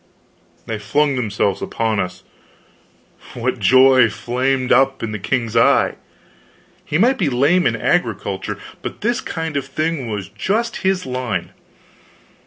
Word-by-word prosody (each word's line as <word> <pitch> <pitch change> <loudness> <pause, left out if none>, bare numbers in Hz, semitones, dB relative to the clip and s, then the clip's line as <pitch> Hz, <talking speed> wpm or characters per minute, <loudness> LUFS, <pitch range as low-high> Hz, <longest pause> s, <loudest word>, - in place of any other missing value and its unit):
they 110 -1 -4
flung 145 +5 +1
themselves 105 -5 -1
upon 110 -2 -1
us. 90 0 -4 1.1
What - - -2
joy 130 -2 +6
flamed 130 +4 -1
up 135 0 +3
in 115 - -3
the 110 - -4
king's 115 +2 -2
eye! - - +4 0.9
He 150 - -1
might 250 +8 +3
be 170 -7 +2
lame 145 +8 +3
in - - 0
agriculture, - - -1 0.2
but - - -7
this 235 +3 0
kind 160 -2 -4
of 140 -1 -2
thing 155 -2 -2
was 105 -3 -4
just 210 - -2
in 190 - 0
his 190 -1 -1
line. 125 -3 -3
130 Hz, 140 wpm, -19 LUFS, 115-160 Hz, 1.1 s, joy